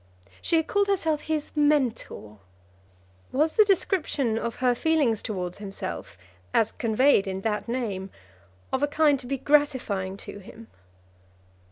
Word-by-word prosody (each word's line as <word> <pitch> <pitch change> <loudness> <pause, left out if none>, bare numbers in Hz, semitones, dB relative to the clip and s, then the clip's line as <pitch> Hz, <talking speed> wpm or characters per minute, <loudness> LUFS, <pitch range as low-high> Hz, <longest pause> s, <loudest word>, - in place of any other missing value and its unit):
She 335 - +1
had 320 -1 +3
called 405 +3 +1
herself 325 -6 0
his 310 -2 -3
mentor. 260 - 0 0.9
Was 305 +4 +1
the 430 - +6
description 350 - +1
of 235 -1 -3
her 250 -1 +2
feelings 270 -5 +1
towards 180 -5 -4
himself, 195 - -6 0.4
as 225 - +3
conveyed 230 -2 +3
in 190 0 -3
that 210 +1 -2
name, 215 -6 -3 0.6
of 265 - +1
a 290 - +3
kind 295 -1 +3
to 250 - -10
be 275 +1 -1
gratifying 250 -10 +1
to 200 - -9
him? 220 +3 -13
255 Hz, 140 wpm, -26 LUFS, 210-300 Hz, 0.9 s, the